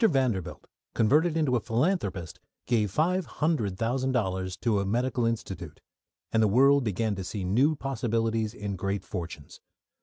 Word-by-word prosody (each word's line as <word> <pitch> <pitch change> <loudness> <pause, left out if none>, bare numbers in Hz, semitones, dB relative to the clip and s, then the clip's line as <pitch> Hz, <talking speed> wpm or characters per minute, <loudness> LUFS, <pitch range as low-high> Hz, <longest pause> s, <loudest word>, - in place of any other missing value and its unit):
Vanderbilt, 130 - +1 0.3
converted 155 +9 +3
into 145 -6 +2
a - - +3
philanthropist, 115 - -1 0.3
gave 110 -4 +1
five 180 - +1
hundred 125 - -1
thousand 130 +4 0
dollars 95 -5 -1
to 110 -4 +1
a - - 0
medical 120 +2 0
institute, 95 -8 -4 0.5
and 110 - +3
the 110 - +5
world 135 +6 +5
began 110 0 0
to 95 -1 -4
see 95 +2 -4
new 125 +12 +3
possibilities 115 -4 -1
in 100 -1 -4
great 100 +2 -2
fortunes. 80 -4 -7
115 Hz, 150 wpm, -28 LUFS, 100-135 Hz, 0.5 s, the